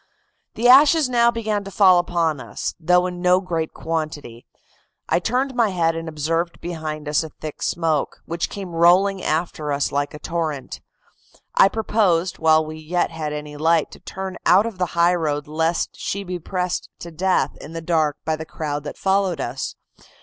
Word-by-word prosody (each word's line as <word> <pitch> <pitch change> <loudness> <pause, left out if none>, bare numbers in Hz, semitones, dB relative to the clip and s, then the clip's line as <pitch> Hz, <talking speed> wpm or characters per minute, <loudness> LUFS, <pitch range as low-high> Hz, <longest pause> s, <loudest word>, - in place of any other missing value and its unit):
"The 235 +2 +2
ashes 290 +3 +7
now 235 -1 +4
began 215 -3 -2
to 195 - -8
fall 185 -2 +5
upon 170 -4 0
us, - - -5
though 180 +2 +3
in 180 -1 -5
no 180 0 +4
great 165 -4 -3
quantity. 155 -7 -5 0.6
I - - +2
turned 255 +7 -1
my 235 -3 +2
head 165 -3 +1
and 165 0 -5
observed 165 +3 -2
behind 155 -3 -5
us 150 0 +2
a 160 - -6
thick 155 0 -9
smoke, 160 -4 0
which 170 +1 -2
came 195 -3 -7
rolling 180 +4 +4
after 155 -2 -2
us 140 0 0
like 145 +1 -2
a - - -8
torrent. 160 -5 -4 0.7
I 195 - +6
proposed, 195 -5 +1
while 160 -1 +4
we 155 0 -7
yet 170 +3 -1
had 155 -2 -4
any 150 0 -6
light, 160 +1 +2
to - - -12
turn 190 -1 -6
out 195 +4 +5
of 225 -5 -6
the 180 - +1
high 170 +1 +5
road 150 -3 -1
lest 160 +2 0
she 200 - -3
should 195 - -10
be 180 -1 -3
pressed 180 +1 -3
to 170 - -9
death 170 -4 0
in 155 - -10
the 165 - -4
dark 160 -3 0
by 160 - +1
the 160 - -6
crowd 150 -2 -4
that - - -6
followed 190 -4 +1
us. 135 +1 -4
170 Hz, 185 wpm, -22 LUFS, 155-185 Hz, 0.7 s, ashes